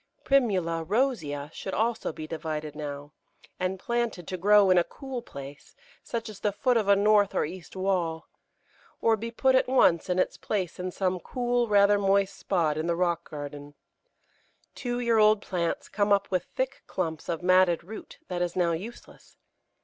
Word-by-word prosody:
Primula 185 -12 +2
rosea 160 - -1
should 190 - -5
also 225 +2 0
be 155 0 -7
divided 155 -2 -5
now, 145 -1 -6 0.5
and 185 +1 -1
planted 235 -6 -2
to 185 - -2
grow 205 +3 +5
on 190 - +4
in 185 - +5
a - - +3
cool 265 +2 -7
place, 140 -6 -11 0.3
such 230 -2 -4
as 215 -2 -9
the 210 - 0
foot 250 +5 +1
of 220 -3 +1
a 200 - +6
north 205 0 +3
or - - +2
east 175 +3 -9
wall, 180 -4 -1 0.7
or 225 -1 +3
be 225 +2 -5
put 260 +3 +2
at 260 - +3
once 185 -10 +3
in 180 - +1
its 185 - 0
place 185 -6 -3
in 180 0 -2
some 185 0 -1
cool, 245 +3 -1
rather 205 -1 +5
moist 195 0 +2
spot 165 -6 0
in 160 - -2
the 170 - +1
rock 170 -1 -1
garden. 145 -1 -8 1.0
Two 245 -1 -3
year 235 -2 +2
old 215 0 +5
plants 175 -4 -2
come 205 0 0
up 200 -1 +2
with 180 -2 0
thick 260 +1 -3
clumps 160 -3 -3
of 170 0 -2
matted 185 -2 +4
root 215 +5 -10
that 180 -1 -3
is 175 -1 -1
now 175 -2 +2
useless. 200 +9 -8
185 Hz, 180 wpm, -27 LUFS, 170-215 Hz, 1.0 s, a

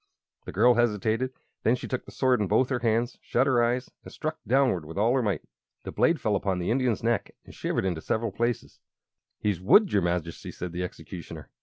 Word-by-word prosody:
The - - -6
girl 120 +5 +5
hesitated. 115 +1 +1 0.3
Then 115 - +3
she - - -7
took 130 - -3
the - - -11
sword 130 -3 +2
in 105 - +1
both 115 +6 +3
her 130 -3 0
hands, 115 +1 0
shut 130 - +1
her 120 -3 +3
eyes, 125 +2 -1
and - - -11
struck 155 0 -4
downward 125 - +3
with 80 +4 -9
all 110 +4 +3
her 130 - +2
might. 100 -9 -1 0.4
The - - -6
blade 165 -2 +2
fell 105 -2 +1
upon 95 -2 0
the 90 +3 -1
Indian's 125 -3 +1
neck 115 -3 0
and - - -13
shivered - - -2
into 85 -4 -1
several 110 +4 -1
pieces. 120 +3 -2 0.6
"He's 100 -5 -1
wood, 195 - +5
your 100 - +4
Majesty," 85 -1 -2
said 90 -1 -6
the 90 +1 -4
Executioner. 90 -1 -8
115 Hz, 210 wpm, -27 LUFS, 95-125 Hz, 0.6 s, girl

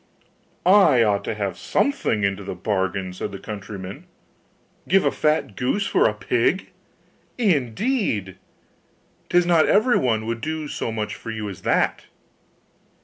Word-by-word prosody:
'I 175 - +6
ought 100 -2 +1
to - - -2
have 100 -4 -3
something 270 - 0
into 100 0 0
the 95 -1 -5
bargain,' 95 -1 -2
said 95 +2 -5
the 100 - -6
countryman; 100 -1 -8 0.8
'give 195 0 +3
a - - +3
fat 150 -9 0
goose 200 - 0
for - - +3
a - - -3
pig, - - 0 0.7
indeed! 145 - 0 0.9
'Tis 175 0 +4
not 170 -3 +4
everyone 130 - +2
would 115 0 -3
do 155 +1 -3
so 115 - -3
much 110 -1 -3
for 115 - -9
you 110 -2 -4
as 95 - -9
that. - - +1
110 Hz, 140 wpm, -23 LUFS, 100-165 Hz, 0.9 s, I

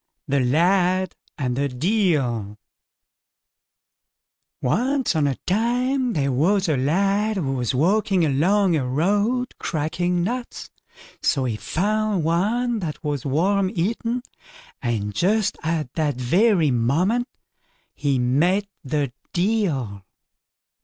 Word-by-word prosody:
THE 140 +1 +1
LAD 180 +7 +2 0.2
AND 125 -4 -1
THE 140 +2 0
DEIL 130 - 0 2.0
Once 255 - 0
on 150 -2 +2
a 135 - 0
time 245 +5 +1
there 140 -4 0
was 185 +9 +2
a 155 - +2
lad 195 +10 +1
who 140 -7 -1
was 125 -1 -1
walking 190 - +2
along 175 +6 +2
a 145 - 0
road 205 - 0
cracking 175 +3 -1
nuts, 240 +5 -4 0.5
so 135 -4 +1
he 120 -3 -1
found 205 - -1
one 220 +9 +1
that 155 -6 -5
was 145 -3 -2
worm 190 +7 +2
eaten, 230 +7 -1 0.6
and 110 -5 -2
just 205 - +1
at 155 -5 -2
that 150 -4 0
very 170 - +3
moment 170 - +1 0.7
he 140 -3 0
met 155 +11 +2 0.2
the 140 -2 -2 0.2
Deil. 170 - 0
170 Hz, 110 wpm, -23 LUFS, 135-205 Hz, 2.0 s, very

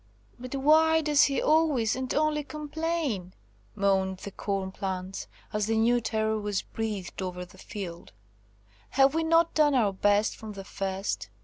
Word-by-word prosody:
"But 255 +2 -6
why 320 +3 +4
does 295 -2 +4
he 275 - 0
always 300 -8 +2
and 260 0 -4
only 300 0 +1
complain?" 300 - -3 0.4
moaned 190 -2 +1
the 200 - -8
corn 195 -1 -3
plants, 190 0 -4 0.3
as 210 -1 0
the 225 0 +1
new 240 +2 +3
terror 220 -1 0
was 205 -2 -2
breathed 210 -5 -5
over 180 -1 -4
the 180 - -18
field. 175 -4 -7 0.8
"Have 270 +1 +4
we 325 0 +1
not 330 +1 +3
done 295 -2 +4
our 215 -6 +2
best 205 +2 +2
from 215 -1 -8
the 195 -1 -8
first? 195 - -3
220 Hz, 155 wpm, -28 LUFS, 195-295 Hz, 0.8 s, why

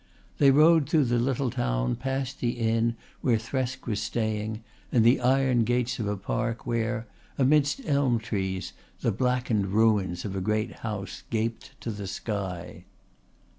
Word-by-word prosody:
They 140 - +7
rode 155 +2 +5
through 155 -2 +4
the 120 0 +1
little 130 +1 0
town, - - 0
past 135 +1 -3
the 120 -1 0
inn 115 0 +1 0.3
where 120 -3 +3
Thresk 130 +2 -3
was 105 -4 -1
staying 110 -1 -2 0.3
and 115 -2 +4
the 120 +3 +5
iron 130 -1 +3
gates 125 +2 0
of 110 - -1
a 105 0 -1
Park 115 +4 -2
where, 115 -1 -1 0.3
amidst 145 - +3
elm 140 - +2
trees, 95 -5 -3 0.3
the 115 - +2
blackened 125 -3 0
ruins 100 -4 +2
of 100 -2 -4
a 95 - -2
great 105 +2 -1
house 100 -4 -5
gaped 115 0 -3
to 115 - -3
the 100 -2 -6
sky. 95 -4 -5
115 Hz, 155 wpm, -27 LUFS, 105-125 Hz, 0.3 s, They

